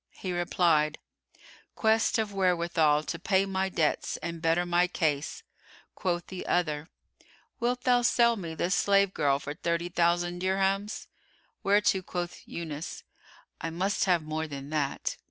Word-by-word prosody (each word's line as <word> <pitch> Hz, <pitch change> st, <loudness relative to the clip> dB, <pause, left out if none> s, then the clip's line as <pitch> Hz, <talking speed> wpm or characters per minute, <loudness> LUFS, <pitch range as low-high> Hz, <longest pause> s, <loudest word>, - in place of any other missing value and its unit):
He 185 Hz, -2 st, -4 dB
replied, 170 Hz, -3 st, +2 dB, 0.8 s
"Quest 225 Hz, +1 st, +2 dB
of 215 Hz, -2 st, -1 dB
wherewithal 170 Hz, -5 st, +2 dB
to 170 Hz, -, -4 dB
pay 190 Hz, +2 st, +2 dB
my 190 Hz, 0 st, -1 dB
debts 160 Hz, -5 st, 0 dB
and 170 Hz, -1 st, -4 dB
better 165 Hz, +2 st, +2 dB
my 175 Hz, 0 st, +3 dB
case." 155 Hz, -4 st, -1 dB, 0.5 s
Quoth 175 Hz, -2 st, -2 dB
the 185 Hz, -1 st, -7 dB
other, 160 Hz, -2 st, 0 dB, 0.7 s
"Wilt 245 Hz, +1 st, 0 dB
thou 245 Hz, -1 st, +4 dB
sell 235 Hz, -1 st, +4 dB
me 170 Hz, -6 st, -6 dB
this 175 Hz, +3 st, 0 dB
slave 200 Hz, -1 st, +3 dB
girl 140 Hz, -3 st, +2 dB
for 145 Hz, +1 st, -6 dB
thirty 170 Hz, +2 st, -2 dB
thousand 175 Hz, 0 st, +1 dB
dirhams?" 195 Hz, +2 st, 0 dB, 0.6 s
Whereto 200 Hz, -1 st, +3 dB
quoth 175 Hz, -1 st, -5 dB
Yunus, 160 Hz, -2 st, -6 dB, 0.6 s
"I 165 Hz, -, -2 dB
must 185 Hz, +5 st, 0 dB
have 175 Hz, -4 st, +2 dB
more 155 Hz, +1 st, -3 dB
than 140 Hz, -1 st, -7 dB
that." 145 Hz, -3 st, -1 dB
175 Hz, 140 wpm, -28 LUFS, 160-195 Hz, 0.8 s, thou